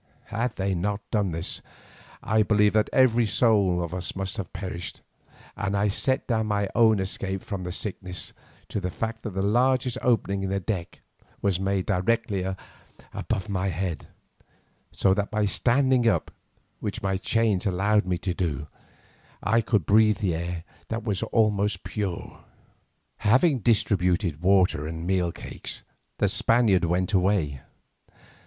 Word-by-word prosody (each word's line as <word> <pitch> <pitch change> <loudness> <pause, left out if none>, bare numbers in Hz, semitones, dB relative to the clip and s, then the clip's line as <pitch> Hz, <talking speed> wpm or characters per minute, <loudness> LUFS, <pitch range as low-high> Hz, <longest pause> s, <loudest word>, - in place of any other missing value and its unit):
Had 115 +3 -1
they 95 0 -1
not 100 +4 -1
done 105 -3 +1
this 80 +3 -3 0.6
I 110 +1 +2
believe 105 -1 +3
that 110 0 +2
every 120 -3 +4
soul 100 -6 +3
of 85 0 -5
us 90 -1 -4
must 95 +2 -3
have 100 - -5
perished, 90 -3 -6 0.5
and 100 0 -1
I 105 +1 +2
set 130 +6 0
down 110 -3 0
my 100 -1 0
own 110 -3 +5
escape 95 0 -3
from 95 -3 -5
the 90 - -3
sickness 90 -4 -3 0.4
to - - -2
the 90 - -2
fact 115 +4 -4
that 105 -5 -6
the 95 - 0
largest 125 +3 +2
opening 100 -5 +1
in 95 - -2
the 100 0 0
deck 90 -2 -4 0.4
was 95 -3 +1
made 95 -1 0
directly 100 +1 0 0.7
above 95 - -2
my 100 -2 -1
head, 90 -3 -3 0.8
so 95 - +2
that 100 +1 -1
by 105 -1 0
standing 125 +4 +2
up, 110 - +1 0.5
which - - -4
my 95 -1 +1
chains 105 0 +1
allowed 100 +2 +2
me 90 -1 0
to 90 0 -2
do, 75 -5 -2 0.8
I 115 +1 +3
could 105 - +1
breathe 105 +1 +4
air 85 -1 -2 0.2
that 115 0 -3
was 105 -4 -1
almost 105 -3 +1
pure. 100 -5 -4 0.8
Having 130 +6 +3
distributed 90 -7 +1
water 90 -5 +3
and 80 +1 -5
meal 90 -2 +1
cakes, - - -5 0.3
the - - +2
Spaniards 110 -7 +3
went 90 +4 0
away. 90 -8 +1
100 Hz, 150 wpm, -26 LUFS, 90-110 Hz, 0.8 s, own